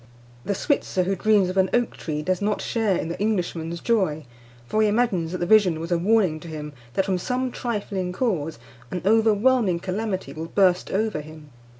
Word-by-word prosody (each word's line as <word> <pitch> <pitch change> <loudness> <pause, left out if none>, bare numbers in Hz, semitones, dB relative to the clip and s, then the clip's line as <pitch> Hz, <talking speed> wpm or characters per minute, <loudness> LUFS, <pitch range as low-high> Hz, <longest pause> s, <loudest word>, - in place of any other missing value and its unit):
The 200 - -1
Switzer 190 -7 0
who 195 +2 0
dreams 205 0 +3
of 185 - -4
an 190 -1 +3
oak 240 -1 0
tree 150 -2 -4
does 185 +3 -1
not 210 0 0
share 220 -6 0
in 160 - -3
the 170 - -5
Englishman's 175 -5 -1
joy; 185 -10 0 0.4
for 215 - 0
he 215 - +4
imagines 205 -7 +1
that 185 - -2
the 175 - -1
vision 185 -5 +4
was 165 +2 -6
a 175 - +3
warning 190 -4 +2
to 170 - -11
him 150 -2 -7 0.2
that, 195 - +2
from 190 -2 0
some 255 +6 -2
trifling 200 -7 -3
cause, 180 - -1 0.3
an 180 - -4
overwhelming 220 -2 +3
calamity 190 +2 -3
will 160 +1 -6
burst 180 0 +2
over 210 -5 -1
him. 155 -1 -13
190 Hz, 195 wpm, -24 LUFS, 170-215 Hz, 0.4 s, he